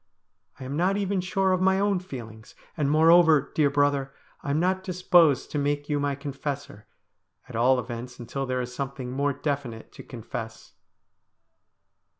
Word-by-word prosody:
I - - -7
am 135 +2 -5
not 185 +5 +1
even 200 -1 0
sure 190 +1 0
of 185 0 +1
my 190 +1 +3
own 200 -2 +1
feelings; 115 -10 -10 0.2
and, 145 -4 0
moreover, 160 -1 +5
dear 150 -2 +3
brother, 140 -1 +1 0.3
I - - -6
am 145 +2 +1
not 185 +2 0
disposed 175 -6 +3
to 150 - -1
make 145 +1 -1
you 145 -1 +1
my 145 -1 -1
confessor, 140 -5 -6 0.6
at 125 - -10
all 125 +3 +4
events 125 +1 -7
until 130 +3 -5
there 130 0 -1
is 125 0 -6
something 135 -1 -5
more 140 +2 0
definite 140 -5 -4
to - - -11
confess.' 115 -1 -8
140 Hz, 160 wpm, -26 LUFS, 130-170 Hz, 0.6 s, moreover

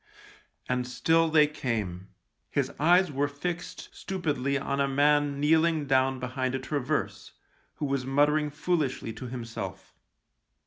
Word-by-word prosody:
And 125 -1 -1
still 165 +6 +2
they 155 -1 +6
came. 105 -11 -3 0.4
His - - -1
eyes 175 +3 +4
were 140 +1 0
fixed 170 +5 -5
stupidly 145 -7 -2
on 140 0 -1
a 140 - +2
man 145 +1 +2
kneeling 160 +1 +3
down 135 -1 +2
behind 130 +1 -2
a - - -1
traverse, 145 +2 -3 0.4
who 150 - -3
was 140 -2 -1
muttering 145 +3 +2
foolishly 145 -6 -1
to 120 +3 -7
himself. 115 -2 -7
140 Hz, 130 wpm, -28 LUFS, 130-155 Hz, 0.4 s, they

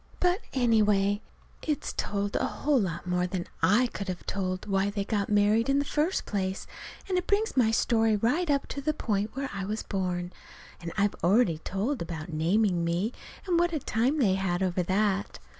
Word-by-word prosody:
But, 360 +4 +2
anyway, 210 -5 +3 0.4
it's 300 -3 -2
told 200 0 -2
a - - +1
whole 285 -4 +1
lot 185 -4 -3
more 180 0 0
than 180 -1 -3 0.2
I 205 +10 +4
could 205 -4 -5
have 185 -1 -5
told 185 -1 -2
why 195 -1 +1
they 200 -1 -3
got 205 -2 -1
married 210 +3 +3
in 275 - +3
the 285 - +1
first 305 +6 0
place, 190 -2 -2 0.4
and 370 -2 +1
it 360 - -7
brings 420 +2 +1
my 245 -4 +4
story 225 -1 +2
right 275 - +1
up 280 -1 +2
to 280 - -4
the 305 +2 0
point 210 -3 -1
where 270 0 -3
I 200 -1 -3
was 210 +3 -3
born; 180 -2 -2 0.5
and 170 -1 -5
I've 205 0 +2
already 180 -3 +3
told 210 - -2
about 165 -1 -5
naming 175 +3 +2
me, 175 +8 0 0.3
and 350 -3 +2
what 345 0 +2
a 310 - 0
time 250 +4 0
they 215 -10 +3
had 190 -1 0
over 185 -1 0
that. 195 +2 0
205 Hz, 190 wpm, -28 LUFS, 185-255 Hz, 0.5 s, I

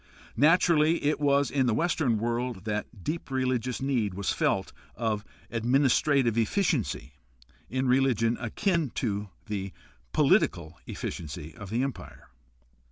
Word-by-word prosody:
Naturally 160 0 +4
it 150 +1 +1
was 140 -1 +2
in 135 -3 +2
the 115 - +2
Western 155 -7 +1
world 120 -2 -2
that 105 -1 -2
the 120 - -22
deep 155 - -4
religious 130 -1 -1
need 120 -9 0
was 100 0 -1
felt - - 0 0.2
of 110 -2 -1 0.3
administrative 125 0 +2
efficiency 130 - 0 0.6
in 130 +4 -1
religion 125 -3 +3
akin 165 - 0
to 105 -3 -2 0.2
the 100 -3 -4 0.4
political - - +2
efficiency 80 0 -6
of 105 -4 -9
the 115 +5 0
Empire. 135 -2 -7
125 Hz, 125 wpm, -28 LUFS, 110-140 Hz, 0.6 s, Naturally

